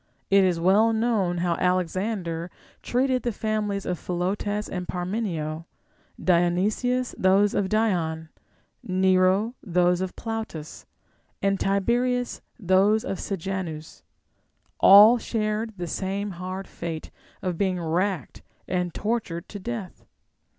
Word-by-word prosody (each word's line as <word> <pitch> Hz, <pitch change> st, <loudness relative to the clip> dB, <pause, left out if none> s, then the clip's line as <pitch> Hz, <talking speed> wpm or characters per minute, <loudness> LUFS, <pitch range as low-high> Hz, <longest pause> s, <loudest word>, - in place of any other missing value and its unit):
It 195 Hz, 0 st, +6 dB
is 180 Hz, -3 st, +2 dB
well 205 Hz, +6 st, +4 dB
known 220 Hz, -6 st, +1 dB
how 175 Hz, -, +2 dB
Alexander 180 Hz, -1 st, -1 dB, 0.3 s
treated 255 Hz, +1 st, +1 dB
the 240 Hz, -, -1 dB
familiars 210 Hz, -2 st, -2 dB
of 180 Hz, -2 st, -2 dB
Philotas 205 Hz, +4 st, -2 dB
and 180 Hz, -1 st, -5 dB
Par 180 Hz, -1 st, -3 dB
menio; 165 Hz, -6 st, -3 dB, 0.5 s
Dionysius, 195 Hz, +8 st, +1 dB
those 195 Hz, +2 st, +4 dB
of 190 Hz, -2 st, 0 dB
Dion; 170 Hz, -7 st, 0 dB, 0.5 s
Nero, 185 Hz, +4 st, +2 dB
those 180 Hz, -1 st, +2 dB
of 190 Hz, -1 st, -4 dB
Plautus; 220 Hz, -9 st, -6 dB, 0.5 s
and 195 Hz, -1 st, +1 dB
Tiberius, 240 Hz, +5 st, 0 dB, 0.2 s
those 200 Hz, +2 st, +3 dB
of 195 Hz, -, -3 dB
Sejanus; 180 Hz, -4 st, -5 dB, 0.8 s
all 210 Hz, +5 st, +9 dB
shared 215 Hz, -1 st, -2 dB
the 175 Hz, -, -3 dB
same 195 Hz, +4 st, -3 dB
hard 185 Hz, +2 st, -6 dB
fate 165 Hz, -2 st, -6 dB, 0.3 s
of 180 Hz, -3 st, -2 dB
being 185 Hz, -2 st, +1 dB
racked 170 Hz, -, -2 dB, 0.3 s
and 180 Hz, -2 st, -2 dB
tortured 210 Hz, -7 st, -2 dB
to 205 Hz, -, -7 dB
death. 215 Hz, -2 st, -6 dB
190 Hz, 115 wpm, -25 LUFS, 175-215 Hz, 0.8 s, all